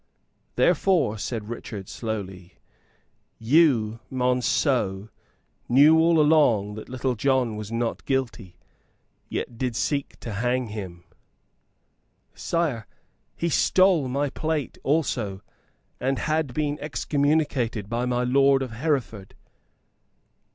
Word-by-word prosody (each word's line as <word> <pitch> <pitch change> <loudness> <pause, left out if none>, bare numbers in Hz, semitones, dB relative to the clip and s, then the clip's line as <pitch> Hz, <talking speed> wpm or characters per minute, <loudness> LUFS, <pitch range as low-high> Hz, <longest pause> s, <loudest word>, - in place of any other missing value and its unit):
"Therefore," 165 - +2
said 110 -1 -4
Richard, 105 -4 -7
slowly, 95 -5 -6 0.8
"you, 115 -4 +3
Monceux, 125 -5 0 0.6
knew 145 +6 +6
all 165 0 +4
along 145 -10 +3
that 110 - -9
Little 130 0 -1
John 125 -1 +1
was 105 0 -7
not 115 0 -2
guilty, 120 -8 -2 0.7
and - - -41
yet 115 - -4
did 125 -3 -2
seek 140 +3 -2
to 115 - -6
hang 120 +3 -1
him." 95 -5 -7 1.3
"Sire, 145 - -2 0.5
he 170 - -2
stole 180 -2 +3
my 140 +2 -1
plate 155 -2 -3
also, 120 -10 -1 0.6
and 135 +1 0
had 155 -1 -1
been 150 +2 -2
excommunicated 145 -7 0
by 120 +3 -2
my 125 0 0
lord 135 +2 +3
of 130 - -6
Hereford." 120 -6 -3
125 Hz, 110 wpm, -25 LUFS, 110-145 Hz, 1.3 s, knew